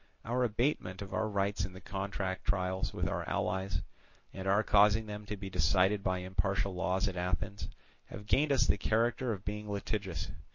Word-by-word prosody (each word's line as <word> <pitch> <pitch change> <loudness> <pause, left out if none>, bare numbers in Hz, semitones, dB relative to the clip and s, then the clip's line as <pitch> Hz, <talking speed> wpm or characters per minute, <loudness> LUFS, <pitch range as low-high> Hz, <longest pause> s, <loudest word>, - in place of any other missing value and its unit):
Our 125 +3 +1
abatement 105 -5 0
of 95 - -9
our 110 0 0
rights 100 -2 0
in 95 0 -4
the 95 - -9
contract 95 -1 -3
trials 95 -1 0
with - - -1
our - - -2
allies, 95 +1 -1 0.5
and 95 0 -5
our 100 +3 +4
causing 105 +2 +5
them 105 0 -7
to 105 0 -4
be 95 0 -6
decided 95 +4 +3
by 95 -1 0
impartial 95 +1 0
laws 95 +1 +1
at 95 - -3
Athens, 90 +3 -2 0.4
have 105 - -9
gained 140 +9 +3
us 125 -3 +4
the - - +2
character 115 +2 +1
of 100 -2 -5
being 105 +1 -4
litigious. 100 -5 -3
100 Hz, 180 wpm, -32 LUFS, 95-105 Hz, 0.5 s, causing